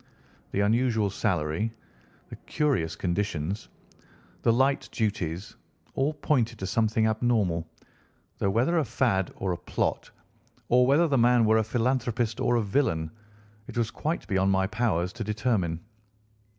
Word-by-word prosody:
The 100 - -1
unusual 110 -1 +2
salary, 85 +4 -1 0.6
the - - -8
curious 135 - -1
conditions, 95 0 -2 0.7
the 115 - +3
light 135 +4 +1
duties, 100 -2 -2 0.4
all 145 +3 0
pointed 120 -6 0
to 95 - -5
something 110 +2 +1
abnormal, 110 -7 +1 0.7
though 100 - +1
whether 125 - +2
a - - +2
fad 115 -6 0
or 95 - -2
a 90 - -2
plot, - - -2 0.6
or 125 +1 +5
whether 150 +5 +4
the 135 -4 +2
man 120 0 +5
were 110 +1 +4
a - - +2
philanthropist 120 0 -1
or 120 - +2
a 115 - +2
villain, 85 - 0 0.6
it - - -8
was 115 -2 0
quite 160 +3 -3
beyond 95 -2 +1
my 95 0 +2
powers 95 -5 0
to 120 0 -5
determine. 105 -6 -1
110 Hz, 140 wpm, -27 LUFS, 95-120 Hz, 0.7 s, or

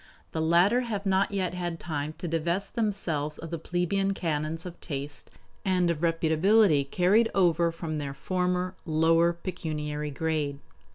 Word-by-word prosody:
The 160 - -2
latter 175 +9 +4
have 215 -5 -3
not 195 0 +2
yet 190 -3 -1
had 175 -2 -3
time 155 -2 -4
to 175 - -5
divest 170 +4 -1
themselves 170 -10 -1
of 165 0 -8
the 170 - -3
plebeian 195 +4 0
canons 160 -1 -2
of 175 -1 -9
taste 145 -1 -5 0.3
and 180 -2 +2
of 160 - -3
reputability 165 -1 +3
carried 200 +8 +3
over 170 -3 +3
from 160 -2 -4
their 140 -1 -4
former, 180 +1 -1
lower 165 +1 +3
pecuniary 155 -4 -4
grade. 150 -1 -1
170 Hz, 150 wpm, -28 LUFS, 155-185 Hz, 0.3 s, latter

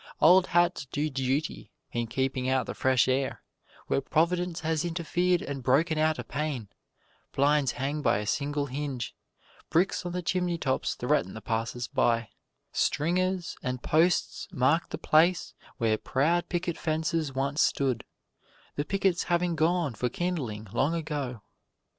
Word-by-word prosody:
Old 180 +3 +6
hats 175 -4 +2
do 150 +3 -2
duty 135 +3 -2 0.2
in 120 -1 -2
keeping 130 +1 -1
out 130 -2 +2
the - - -5
fresh 130 -1 +3
air 130 +1 0 0.4
where - - 0
Providence 175 +4 0
has 160 -1 0
interfered 175 +1 0
and 140 -1 -5
broken 155 +6 +2
out 155 0 +2
a - - -4
pane; 145 -8 -3 0.7
blinds 145 0 +3
hang 140 +4 -2
by 145 - +3
a 105 - -3
single 145 +5 -1
hinge; 135 -3 -4 0.6
bricks 180 +3 +2
on 175 - -4
the 180 0 -3
chimney 180 0 0
tops 130 -5 -1
threaten 95 - 0
the - - -5
passersby; 115 0 -1 0.4
stringers 180 +3 0
and 125 -1 -3
posts 165 +3 +2
mark 145 +7 +2
the - - -4
place 170 +3 +3 0.2
where 110 -2 +1
proud 165 +6 +1
picket 175 -1 -2
fences 155 -2 -1
once 140 +3 0
stood 130 -4 +1 0.7
the 145 - +1
pickets 190 +1 0
having 175 -1 +1
gone 160 -2 +1
for 125 +3 -1
kindling 125 -10 -3
long 145 +5 +1
ago. 145 -9 -4
150 Hz, 145 wpm, -28 LUFS, 130-170 Hz, 0.7 s, Old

